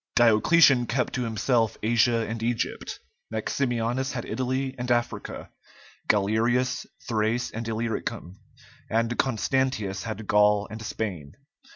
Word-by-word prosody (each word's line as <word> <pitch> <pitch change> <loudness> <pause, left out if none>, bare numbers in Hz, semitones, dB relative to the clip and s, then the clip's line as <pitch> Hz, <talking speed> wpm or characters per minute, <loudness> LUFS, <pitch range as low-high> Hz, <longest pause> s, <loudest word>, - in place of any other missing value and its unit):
Diocletian 120 +3 +5
kept 125 +1 -1
to 125 -2 -1
himself 115 +1 +1
Asia 115 0 +3
and 110 +1 -4
Egypt; 115 0 -2 0.3
Maximianus 120 +2 -1
had 120 -2 -4
Italy 130 +1 -2
and 125 0 -3
Africa; 120 -1 -2 0.6
Galerius, 115 +5 +1 0.2
Thrace 115 +1 0
and 115 +1 -5
Illyricum; 110 -4 -3 0.5
and 115 +1 +1
Constantius 115 -5 0
had 110 -1 -5
Gaul 105 0 +3
and 110 +1 -7
Spain. 95 -10 -5
115 Hz, 110 wpm, -26 LUFS, 110-125 Hz, 0.6 s, Diocletian